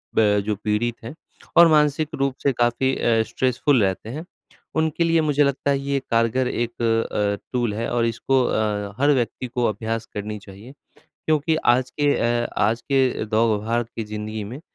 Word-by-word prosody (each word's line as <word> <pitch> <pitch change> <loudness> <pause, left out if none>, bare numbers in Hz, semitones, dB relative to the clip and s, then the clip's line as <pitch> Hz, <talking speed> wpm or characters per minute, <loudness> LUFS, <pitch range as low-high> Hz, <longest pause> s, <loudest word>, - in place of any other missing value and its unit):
ब 105 -2 +4
जो 105 0 0
पीड़ित 105 +3 -1
हैं 115 +4 -7 0.4
और 170 0 +9
मानसिक 150 0 +2
रूप 135 -1 -1
से 140 - +3
काफ़ी 120 +2 +1
अ, 115 -1 +2
स्ट्रेसफुल 130 -1 +1
रहते 95 +3 -2
हैं, 155 +8 -6 0.5
उनके 160 +1 +1
लिए 165 -1 +3
मुझे 150 -1 +2
लगता 140 0 0
है 140 - +1
ये 140 0 -1
कारगर 115 +2 +1
एक 120 -1 -3
अ 115 -1 0
अ, 100 -1 0 0.2
टूल 120 -4 0
है 115 +2 -3
और 120 -1 +1
इसको 125 +3 +1
अ, 105 -3 -1
हर 145 +1 +5
व्यक्ति 125 0 -2
को 120 0 -1
अभ्यास 110 +1 -2
करनी 105 +1 -5
चाहिए 100 +5 -13 0.5
क्योंकि 155 +1 +2 0.2
आज 125 0 -2
के 145 +1 +1
अ, 120 0 +1
आज 115 +3 +1
के 130 -3 +1
दौड़-भाग 110 +1 0
की 115 - -3
जिंदगी 105 0 -5
में 120 +8 -8
120 Hz, 180 wpm, -22 LUFS, 110-135 Hz, 0.5 s, और